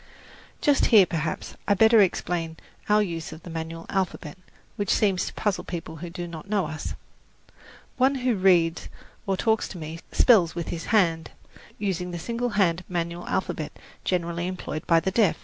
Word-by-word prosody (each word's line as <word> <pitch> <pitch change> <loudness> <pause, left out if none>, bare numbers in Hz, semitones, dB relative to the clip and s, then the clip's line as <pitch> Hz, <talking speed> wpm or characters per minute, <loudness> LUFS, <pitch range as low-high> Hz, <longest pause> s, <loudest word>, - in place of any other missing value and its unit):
Just 290 -3 +3
here, 210 -5 +7
perhaps, 160 -2 -3
I 205 - +5
had - - -2
better 220 +1 +7
explain 170 -3 0 0.3
our 210 0 +5
use 165 -5 -5
of 160 +1 -11
the 175 - -8
manual 165 0 -5
alphabet, 185 -6 -2 0.4
which 205 -2 -3
seems 195 -3 +2
to - - -6
puzzle 205 -3 -1
people 165 -2 -6
who 175 +2 -7
do 175 0 -6
not 170 +3 -9
know 205 -4 +1
us. 155 0 -5 1.0
One 265 +2 +3
who 255 -2 +1
reads 180 -4 +3 0.4
or 195 -1 +1
talks 220 +2 +1
to 190 - -9
me 160 0 -6
spells 190 -10 +5
with 170 -2 -4
his 165 -1 -4
hand, 165 -7 +2 0.5
using 185 -3 -2
the 175 - -5
single 235 +7 -2
hand 180 -2 +2
manual 170 -1 -3
alphabet - - -2 0.3
generally 170 -1 -1
employed 180 -4 -5
by 165 -1 +5
the 190 - -1
deaf. 210 0 +3
180 Hz, 175 wpm, -25 LUFS, 165-205 Hz, 1.0 s, here